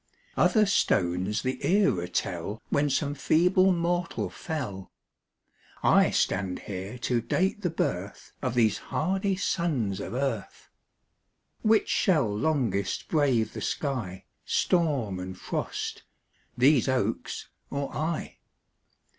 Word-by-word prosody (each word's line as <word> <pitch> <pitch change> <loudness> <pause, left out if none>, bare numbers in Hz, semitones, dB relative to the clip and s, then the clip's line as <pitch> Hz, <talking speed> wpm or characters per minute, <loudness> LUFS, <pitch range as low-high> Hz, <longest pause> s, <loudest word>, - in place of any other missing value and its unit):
Other 215 -3 +4
stones 95 - +1
the 130 0 -3
era 180 - +2
tell 100 +4 -3
When 145 +1 +2
some 140 +1 0
feeble 180 +5 +3
mortal 175 0 -1
fell; 120 - -5 0.9
I - - +5
stand 90 -1 0
here 100 +4 -6
to 120 -1 0
date 190 - 0
the 175 - 0
birth 100 - -3
Of 125 -3 -2
these 110 -4 +3
hardy 190 +3 -1
sons 145 - -1
of 110 - -5
earth. 130 -6 -3 0.9
Which 220 0 +3
shall 160 - +3
longest 110 -7 0
brave 130 -8 +2
the - - -6
sky, 115 - -3 0.2
Storm 140 - +1
and 90 0 -6
frost - - -4 0.6
these 135 +1 +4
oaks 115 -4 -2 0.2
or 140 0 -3
I? 160 +1 -3
130 Hz, 115 wpm, -27 LUFS, 100-170 Hz, 0.9 s, I